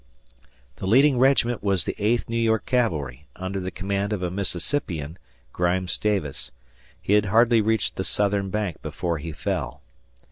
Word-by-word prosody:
The 95 - -4
leading 130 +4 +5
regiment 125 -3 +3
was 95 -3 +1
the - - -2
Eighth 115 +3 +1
New 115 - -4
York 110 -1 +2
Cavalry 75 - -1
under 95 +1 -4
the 95 0 -3
command 100 +2 -2
of 95 -3 -3
a 90 - -1
Mississippian, 90 - -3 0.3
"Grimes" 90 +1 0
Davis. 100 -10 -1 0.5
He 100 - 0
had 105 0 +4
hardly 115 +3 +4
reached 110 0 0
the 95 - -1
southern 100 0 0
bank 105 -4 -2
before 85 -3 -3
he 80 +2 -5
fell. - - -3
100 Hz, 155 wpm, -24 LUFS, 90-110 Hz, 0.5 s, leading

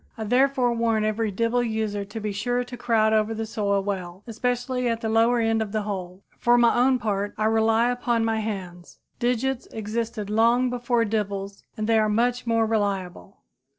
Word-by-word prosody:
I 220 - -4
therefore 250 +2 +2
warn 230 -2 +1
every 215 +1 0
dibble 230 +4 0
user 220 -3 -2
to 210 +3 -7
be 210 -1 -3
sure 245 +5 -1
to 245 0 -9
crowd 220 -3 +2
over 220 +1 +1
the 225 0 -3
soil 200 -2 -1
well, 190 -1 -5
especially 245 +2 -2
at 230 0 -2
the 220 - -2
lower 230 +2 +3
end 225 -1 +1
of 215 -1 -4
the 215 -1 0
hole. 190 -2 -6 0.2
For 240 0 +4
my 235 -1 +4
own 255 +1 +3
part, 205 -3 -2
I 215 - 0
rely 225 +2 +3
upon 240 -2 0
my 225 -1 0
hands. 185 -5 -6 0.2
Digits 250 +1 -1
existed 220 0 -4
long 235 +4 +3
before 240 -1 0
dibbles 200 -2 -3 0.2
and 215 - -2
they 225 0 +3
are 215 0 +2
much 245 +3 0
more 230 -1 +2
reliable. 200 -4 -3
225 Hz, 185 wpm, -24 LUFS, 210-240 Hz, 0.2 s, For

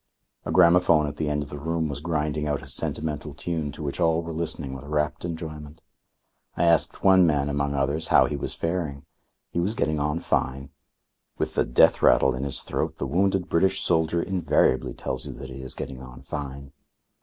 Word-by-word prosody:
A - - -3
gramophone 85 -3 +5
at 75 - -5
the 75 -2 -1
end 75 0 -1
of - - -12
the 75 - -6
room 80 +2 -1
was 70 -1 -4
grinding 75 -1 -1
out 75 -1 -2
a - - -10
sentimental 75 -1 -3
tune 80 -3 -3
to 80 - -8
which 70 +3 -4
all 85 -1 +2
were 85 0 -6
listening 80 -4 -2
with 65 - -8
rapt 75 +1 -1
enjoyment. 80 -2 -7 0.7
I - - +1
asked 85 -2 +2
one 95 -2 +6
man, 75 -2 +1
among 70 0 -1
others, 70 +3 0
how - - +5
he 75 - -3
was 70 - -3
faring. 80 -5 -3 0.5
He - - -1
was 100 +6 0
getting 75 -6 0
on 75 +3 0
fine. 70 -3 -2 0.7
With - - -2
the - - +1
death - - +4
rattle 65 - +5
in 65 +2 -3
his 70 - -1
throat - - -3
the - - -3
wounded 95 +5 +1
British 95 +3 +1
soldier 80 0 +1
invariably 95 -2 +1
tells 65 0 -3
you - - -6
that 65 -1 -9
he 65 0 -8
is 65 - -5
getting 65 -2 -6
on 65 0 -12
fine. 70 -1 -6
75 Hz, 200 wpm, -25 LUFS, 70-85 Hz, 0.7 s, one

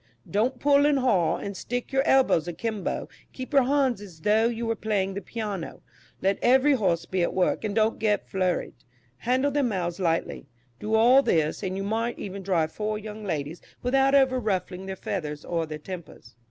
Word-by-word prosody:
Don't 240 +5 0
pull 285 0 +4
and 295 -1 +3
haul, 205 -11 +2
and 200 0 -6
stick 245 +7 -4
your 270 - +4
elbows 255 -11 +4
a 175 - -3
kimbo; 215 +3 -3 0.3
keep 260 +3 -7
your 275 -3 +5
hands 265 -5 +1
as 175 -6 -12
though 215 +5 +3
you 235 0 -3
were 225 0 0
playing 200 -3 -1
the 200 - -4
piano; 205 -7 -5 0.4
let 195 +1 +2
every 265 +4 +5
horse 175 -9 +1
be 185 +1 -1
at 170 - 0
work, 185 +3 +1
and 210 -2 -2
don't 220 0 +2
get 210 -2 0
flurried; 185 -2 -1 0.4
handle 260 - +1
their 290 +1 +1
mouths 185 -8 -1
lightly; 165 -5 -1 0.3
do 215 +6 -1
all 245 +5 +6
this, 160 - +1
and 190 -2 -3
you 195 - -3
might 225 +4 -1
even 200 0 -6
drive 170 -5 0
four 215 +2 -2
young 215 0 -8
ladies 160 -3 -4 0.2
without 270 +2 +3
ever 265 -2 +4
ruffling 190 -3 -2
their 190 - -4
feathers 150 -6 -5
or 165 -2 -2
their 155 0 -5
tempers." 155 - -10
210 Hz, 195 wpm, -26 LUFS, 180-245 Hz, 0.4 s, all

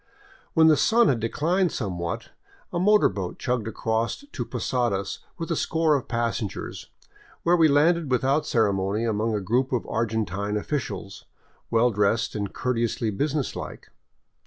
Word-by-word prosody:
When 160 - +6
the 155 -2 +6
sun 235 +1 +4
had 125 - +1
declined 170 - +1
somewhat, 85 -6 -4 0.4
a 175 - 0
motor 210 +3 +5
boat 95 -3 -4
chugged 125 -3 -1
across 110 +1 -1 0.2
to 125 - -3
Posadas 120 -5 -1 0.2
with 165 0 -4
a - - +2
score 160 0 +1
of 140 -3 -1
passengers, 115 -3 -3 0.5
where 175 +1 +4
we 165 -2 +5
landed 155 +2 +3
without 135 +4 +1
ceremony 100 -1 +1
among 110 0 0
a 105 - -1
group 120 +7 0
of 125 -3 -1
Argentine 105 -2 -1
of 105 - -4
ficials, 130 -9 -4 0.4
well 120 +1 +3
dressed 105 +2 +1
and 100 -2 -3
courteously 115 -2 -1
business 145 +6 -1
like. - - -8
115 Hz, 150 wpm, -25 LUFS, 105-150 Hz, 0.5 s, When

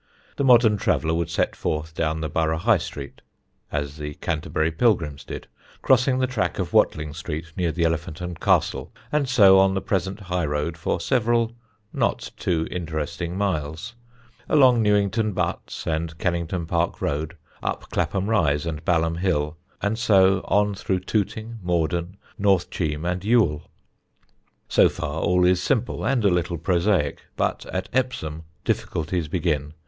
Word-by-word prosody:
The - - 0
modern 120 -5 +6
traveller 80 -4 +1
would 85 0 -1
set 85 - 0
forth 80 +1 -3
down 80 0 -1
the 80 - -1
Borough 80 +1 0
High 80 - +3
Street 70 -1 -8 0.5
(as 70 0 -3
the 75 -1 -6
Canterbury 80 -1 -1
Pilgrims 80 - +1
did), - - -7 0.4
crossing 130 0 +4
the 130 - +2
track 110 -10 -1
of - - -3
Watling 75 -1 +2
Street 80 +2 -6
near 85 -3 0
the 85 +2 -1
Elephant 80 -1 -1
and 90 -2 -6
Castle, - - +1 0.2
and 150 -3 +1
so 100 -6 +7
on 95 0 +4
the - - +1
present 95 +1 -2
high 90 -4 -1
road 75 +3 -2
for 80 +2 -2
several 115 +2 +1 0.4
not - - -1
too 80 -2 -1
interesting 80 0 -4
miles; 90 +1 -2 0.6
along 130 -5 +5
Newington 105 +1 +2
Butts, - - -3
and 80 0 -2
Kennington 85 0 -1
Park 85 +1 -1
Road, 80 +4 -2 0.2
up - - -3
Clapham 90 +3 0
Rise 80 -9 +2
and 80 -1 -4
Balham 80 -1 +1
Hill, 75 -4 0 0.3
and 105 +2 0
so 95 -5 +4
on 105 0 +2
through 95 -1 -2
Tooting, 110 +3 -2
Morden, 85 +1 -1 0.2
North 100 -3 +2
Cheam, 75 -2 -2
and 90 +1 -2
Ewell. 100 -9 +2 1.0
So - - +5
far 75 +3 -4
all 90 +1 +3
is 90 0 +3
simple 125 -3 0
and 120 -2 +1
a - - +6
little 85 0 -1
prosaic, 85 -3 +1
but - - -1
at - - -3
Epsom 80 -12 -2 0.2
difficulties 80 +1 -1
begin. 75 -3 -1
85 Hz, 155 wpm, -24 LUFS, 80-100 Hz, 1.0 s, so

